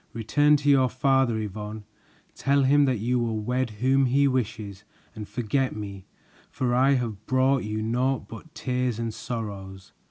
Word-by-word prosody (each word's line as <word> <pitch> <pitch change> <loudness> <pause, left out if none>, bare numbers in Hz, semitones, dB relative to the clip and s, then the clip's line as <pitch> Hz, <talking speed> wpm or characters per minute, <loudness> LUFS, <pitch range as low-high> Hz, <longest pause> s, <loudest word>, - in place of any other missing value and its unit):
"Return 145 +7 +3
to 145 0 -5
your 135 -3 +5
father, 135 -3 +2
Yvonne. 105 0 -5 0.5
Tell 140 0 +1
him 145 +2 +4
that 130 -3 +1
you 120 +4 0
will 115 -2 -1
wed 125 +3 -1
whom 130 +5 +2
he 140 +3 +3
wishes 110 -6 -3 0.3
and 105 -1 -8
forget 130 +3 -1
me, 100 -3 -7 0.4
for 125 -2 -1
I 130 +3 +4
have 110 -5 -4
brought 130 0 +2
you 110 0 -3
naught 125 0 0
but 150 +9 -12
tears 125 -5 -1
and 115 -1 -3
sorrows." 100 -5 -7
120 Hz, 160 wpm, -26 LUFS, 110-135 Hz, 0.5 s, your